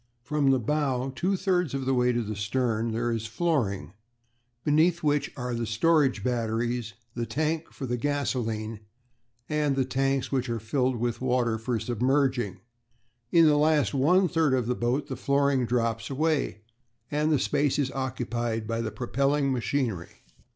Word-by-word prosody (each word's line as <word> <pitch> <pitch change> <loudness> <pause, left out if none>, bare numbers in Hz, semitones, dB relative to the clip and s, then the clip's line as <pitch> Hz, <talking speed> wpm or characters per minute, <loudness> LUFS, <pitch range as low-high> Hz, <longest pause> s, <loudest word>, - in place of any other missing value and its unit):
"From 145 +2 +1
the 135 - +4
bow 135 +1 -1
two 190 +5 0
thirds 180 -7 0
of 135 -1 -3
the 135 - +1
way 125 -1 +3
to 120 -1 0
the 110 0 -4
stern 115 +2 -1
there 120 +2 -1
is 115 -1 -2
a - - -13
flooring, 110 - -1 0.7
beneath 160 +3 +3
which 145 -1 +1
are 125 -1 -3
the 115 -1 -2
storage 135 -1 +2
batteries, 115 -1 -1 0.2
the 120 -1 -3
tank 155 +6 -1
for 135 - -6
the 125 -1 -1
gasolene, 115 -6 -2 0.7
and 150 -2 +1
the 135 -1 +1
tanks 135 0 0
which 130 -2 0
are 115 -1 -1
filled 125 +4 0
with 120 +1 -2
water 125 -3 +1
for 115 +1 -1
submerging; 120 -3 0 0.7
in 165 -1 +6
the 150 -1 +5
last 150 0 +3
one 175 +8 +4
third 160 -5 +2
of 125 -3 0
the 125 - 0
boat 125 +4 -1
the 130 - -5
flooring 140 -1 +1
drops 115 -2 -1
away, 150 -5 0 0.5
and 150 +1 +1
the 150 - +4
space 145 +1 +1
is 135 -3 0
occupied 120 -3 -2
by 115 +1 -2
the 115 - -2
propelling 140 +4 0
machinery. 120 -7 -2
130 Hz, 165 wpm, -27 LUFS, 115-145 Hz, 0.7 s, in